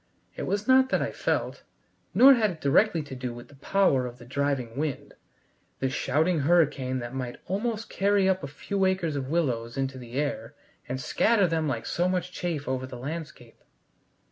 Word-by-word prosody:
It - - -4
was 205 +2 -1
not 260 0 +5
that - - +1
I - - -3
felt. - - -2 0.5
Nor 275 +2 +9
had 225 -4 +2
it 170 -4 -7
directly 160 +4 +3
to 145 - -9
do 125 -2 -5
with 120 +2 -11
the 145 - -16
power 140 -5 +2
of 120 0 -9
the 120 - -13
driving 135 -3 -2
wind 145 0 -3 0.6
this 130 0 -2
shouting 160 +4 +1
hurricane 140 -4 +2
that 120 0 -6
might 125 -2 -5
almost 220 +4 -2
carry 200 0 +2
up 190 0 +2
a 140 - -5
few 195 +7 -3
acres 185 -5 0
of 135 -2 -3
willows 125 -8 -1
into 135 -1 -2
the 120 -1 -11
air 145 +2 -3 0.3
and 130 +1 -2
scatter 200 - +2
them 160 -2 0
like 120 -5 -2
so 175 +1 0
much 180 -1 -1
chaff 165 -6 -3
over 130 0 -2
the 125 - -8
landscape. 145 -3 -7
145 Hz, 190 wpm, -27 LUFS, 130-185 Hz, 0.6 s, Nor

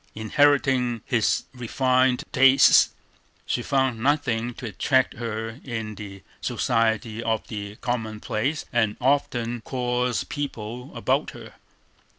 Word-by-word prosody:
Inheriting 125 0 +2
his 115 -3 +1
refined 130 +1 +1
tastes, 135 0 +6 0.6
she 120 - -1
found 130 -2 0
nothing 120 -3 0
to 130 - -8
attract 130 +5 +1
her 115 +1 -5
in 110 -4 -4
the 100 -2 -10 0.2
society 115 0 0
of 115 -1 -1
the 105 -2 -6
commonplace 115 +3 -2
and 110 -3 +1
often 120 -3 0
coarse 125 0 -1
people 125 -4 -6
about - - 0
her. - - -12
120 Hz, 110 wpm, -24 LUFS, 110-130 Hz, 0.6 s, tastes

